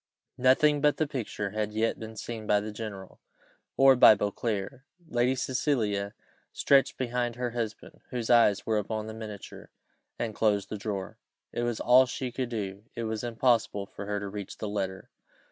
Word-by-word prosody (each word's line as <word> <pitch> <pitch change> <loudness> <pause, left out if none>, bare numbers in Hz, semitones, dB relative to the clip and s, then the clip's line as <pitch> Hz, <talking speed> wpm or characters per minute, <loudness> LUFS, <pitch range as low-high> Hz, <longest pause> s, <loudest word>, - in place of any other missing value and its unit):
Nothing 145 +3 +4
but 150 0 +3
the 155 - +1
picture 115 -8 -4
had 105 0 -2
yet 110 +1 0
been 110 0 -8
seen 110 -1 -6
by 105 - +4
the 105 +1 -5
general 105 -3 -8 0.6
or 135 0 +7
by 115 -3 +8
Beauclerc: 105 +3 -3 0.3
Lady 120 -1 +1
Cecilia 110 -7 -1 0.4
stretched 140 -1 +3
behind 120 -1 -1
her 125 0 -2
husband, 115 -2 -5
whose 120 -3 -3
eyes 115 -5 +4
were 110 -1 +1
upon 110 +1 -3
the 110 - -6
miniature, 110 -3 -9 0.5
and 115 -2 -3
closed 105 -2 +1
the - - -4
drawer. 100 -2 -5 0.3
It - - -3
was 120 -2 -1
all 130 +1 +6
she 125 0 -4
could 125 0 -3
do, 100 -3 -5
it 115 - -3
was 110 0 -3
impossible 115 -4 +1
for 100 0 -9
her 105 0 -1
to 100 - -5
reach 100 -1 -7
the 110 - -4
letter. 95 -2 -4
110 Hz, 175 wpm, -28 LUFS, 105-125 Hz, 0.6 s, by